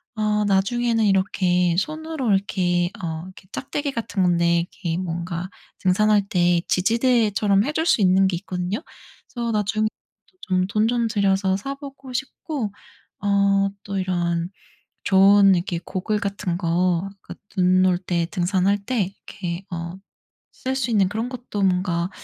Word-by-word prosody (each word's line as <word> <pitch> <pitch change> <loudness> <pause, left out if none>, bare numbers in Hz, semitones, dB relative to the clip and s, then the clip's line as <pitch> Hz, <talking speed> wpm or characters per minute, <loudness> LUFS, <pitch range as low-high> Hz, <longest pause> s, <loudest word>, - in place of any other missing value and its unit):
어 210 -1 +1
나중에는 225 +4 +2
이렇게 185 -3 +2
손으로 310 - -1
이렇게 175 -3 +1
어 160 -1 -3
이렇게 185 0 -14
작대기 285 +1 -3
같은 225 -6 -2
건데 170 -1 +3
이렇게 170 -1 -4
뭔가 175 0 -4 0.3
등산할 205 +2 +3
때 175 -1 +3
지지대처럼 215 -1 +2
해 300 - -2
줄 320 - 0
수 245 - +3
있는 190 0 +4
게 190 - -1
있거든요. 185 - -3 0.5
그래서 235 -2 -2
나중에 215 0 +1 0.5
좀 185 -1 0
돈 215 +2 +1
좀 240 0 +1
들여서 195 -2 +1
사 275 +7 -5
보고 275 -2 -10
싶고 265 -3 -4 0.5
어 200 -1 +3 0.2
또 200 -1 -4
이런 175 -2 -1 0.6
좋은 195 0 +6
이렇게 175 -1 -2
고글 210 +3 -2
같은 195 -3 -2
거 175 +2 +1
그 - - -10 0.2
눈 185 0 +4
올 180 -1 +3
때 175 -2 -1
등산할 190 +1 +1
때 250 -5 +1 0.2
이렇게 180 -1 -5
어 170 +1 -5 0.5
쓸 260 +1 -4
수 255 -3 -1
있는 195 -4 +3
그런 225 +4 -3
것도 245 -5 -5
뭔가 180 -2 +1
195 Hz, 275 characters per minute, -23 LUFS, 180-215 Hz, 0.6 s, 좋은